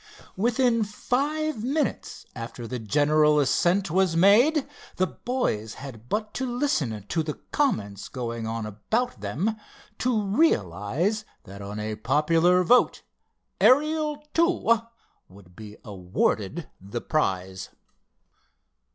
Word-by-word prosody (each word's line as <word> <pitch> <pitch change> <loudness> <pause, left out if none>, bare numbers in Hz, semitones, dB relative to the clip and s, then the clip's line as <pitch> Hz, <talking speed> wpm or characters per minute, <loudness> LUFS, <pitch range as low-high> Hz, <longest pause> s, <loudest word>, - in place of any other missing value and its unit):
Within 235 +2 +2
five 280 +5 -1
minutes 280 +3 -2
after 115 0 -7
the 125 +1 -4
general 150 +6 +3
ascent 175 +6 +2
was 185 -1 +2
made 240 - +5 0.3
the 185 - +2
boys 180 - -2
had 125 -4 -10
but 215 0 -2
to 265 - -2
listen 145 - -1
to 165 - 0
the 150 -1 -4 0.2
comments 105 - -1
going 115 -3 -4
on 115 -1 -3
about 110 - -2
them, 150 - -1 0.4
to 240 -4 +1
realize 175 - +1 0.2
that 100 +1 -11
on 100 +1 -6
a 105 0 -4
popular 165 +9 +3
vote 245 +8 +3 0.6
Ariel 300 +2 +3
II 330 -10 +3 0.5
would 90 -2 -17
be 105 0 -10
awarded 100 - -1
the 100 +5 -5
prize. 95 - -1
160 Hz, 115 wpm, -26 LUFS, -, 0.6 s, made